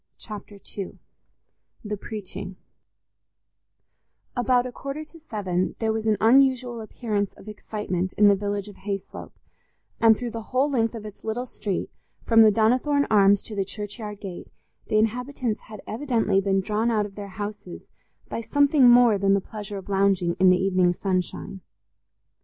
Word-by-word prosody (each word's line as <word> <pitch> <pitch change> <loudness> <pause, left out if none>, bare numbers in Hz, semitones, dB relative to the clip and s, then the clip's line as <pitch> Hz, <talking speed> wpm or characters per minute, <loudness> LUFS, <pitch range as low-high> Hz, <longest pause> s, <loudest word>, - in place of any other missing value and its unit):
Chapter 205 -1 -10 0.2
II 195 - -5 0.9
The 210 0 -2
Preaching 200 -2 -7 1.8
About 245 0 +2
a 250 - -5
quarter 275 +4 -6
to 320 +2 -16
seven 190 - -2
there 220 -1 0
was 220 0 -2
an 215 -1 +3
unusual 250 0 +3
appearance 210 -2 -3
of - - -16
excitement 200 -4 -3
in 210 - +5
the 200 - +6
village 205 0 -3
of 205 - -12
Hayslope, 195 -1 -6 0.7
and 225 -1 +6
through 240 -1 -4
the 230 0 -5
whole 260 +6 0
length 230 -3 +1
of 215 -2 -7
its 210 -1 -11
little 230 +3 -2
street, 205 -6 -4 0.3
from 225 -1 +5
the 220 - +8
Donnithorne 255 +7 +2
Arms 200 -1 +5
to 215 - -8
the 195 - 0
churchyard 210 +1 -7
gate, 185 -3 -7 0.4
the 215 - +1
inhabitants 240 +1 -1
had 215 - -9
evidently 225 -5 +1
been 195 0 +1
drawn 215 +4 0
out 215 -3 +1
of 200 - -9
their 205 0 -7
houses 205 -3 -6 0.4
by - - -4
something 285 +1 +4
more 240 -4 +6
than 195 0 +3
the - - +2
pleasure 205 0 -7
of 190 - -9
lounging 195 -3 +2
in 185 0 +6
the 180 - +5
evening 185 -2 +2
sunshine. 185 +1 -3
210 Hz, 160 wpm, -25 LUFS, 195-235 Hz, 1.8 s, the